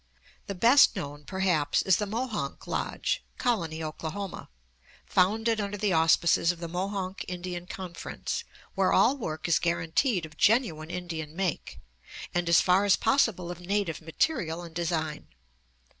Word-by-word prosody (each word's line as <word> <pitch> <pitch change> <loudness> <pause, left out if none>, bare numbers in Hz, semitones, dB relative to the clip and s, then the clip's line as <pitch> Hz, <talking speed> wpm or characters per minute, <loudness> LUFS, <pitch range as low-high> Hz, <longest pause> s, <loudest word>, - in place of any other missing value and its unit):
The 200 - -4
best 240 +9 +6
known, 145 -5 -6
perhaps, 175 -6 +1
is 190 - +4
the 210 - -2
Mohonk 220 - -3
Lodge, - - -2
Colony, 170 -10 -1
Oklahoma, 165 +5 -5 0.6
founded 220 +4 +2
under 205 0 -3
the 205 -2 +1
auspices 165 +1 +4
of 175 - -10
the 170 - -5
Mohonk 190 +2 -3
Indian 180 -1 -5
Conference, 180 -3 -5 0.3
where - - +2
all 275 - +4
work 160 - -4
is 165 -3 +3
guaranteed 170 - 0
of 155 -1 -14
genuine 190 -9 +2
Indian 165 -4 -5
make, 185 -3 -3 0.5
and, 175 -1 0
as 170 - +6
far 185 +2 +4
as 200 -2 +5
possible, 200 -10 +1
of 175 - -8
native 190 -3 -1
material 170 - -1
and 165 -1 -10
design. 160 -3 -2
180 Hz, 145 wpm, -28 LUFS, 165-205 Hz, 0.6 s, best